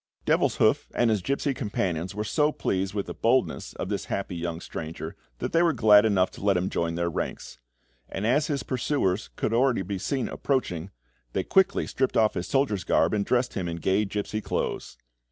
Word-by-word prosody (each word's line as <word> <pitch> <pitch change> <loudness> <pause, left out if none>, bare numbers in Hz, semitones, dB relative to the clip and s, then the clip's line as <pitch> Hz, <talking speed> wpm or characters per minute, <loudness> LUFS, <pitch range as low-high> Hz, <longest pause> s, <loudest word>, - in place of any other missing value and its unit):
Devilshoof - - +2
and 120 -2 +3
his 105 -3 +1
gipsy 140 +4 0
companions 95 -6 -2
were 105 - -2
so 150 +7 +2
pleased 95 -6 -2
with 100 - -1
the - - -6
boldness 125 +3 +1
of - - -5
the - - -2
hapless 95 -3 -3
young 85 -1 -3
stranger 80 -1 -6 0.2
that - - -3
they 165 - +4
were 170 -2 +3
glad 105 -4 +6
enough 95 -4 +2
to - - -11
let 100 -2 +3
him 90 +2 -1
join 85 0 -1
their 85 0 0
ranks; 85 - -4 0.5
and 100 - -3
as 145 +6 +2
his 145 -3 -1
pursuers 120 -6 -1
could 110 - -1
already 125 -3 +3
be 95 +1 -4
seen 135 +5 -1
approaching, 95 - -2 0.4
they 95 - 0
quickly 190 - +3
stripped 130 -1 -1
off 110 -1 +4
his 90 - -3
soldier's 135 -9 +1
garb 80 +4 +2
and 100 -2 0
dressed 125 0 +1
him 95 -3 -2
in 85 0 -3
gay 95 +5 +1
gipsy 105 +1 -3
clothes. - - -3
105 Hz, 195 wpm, -26 LUFS, 90-130 Hz, 0.5 s, glad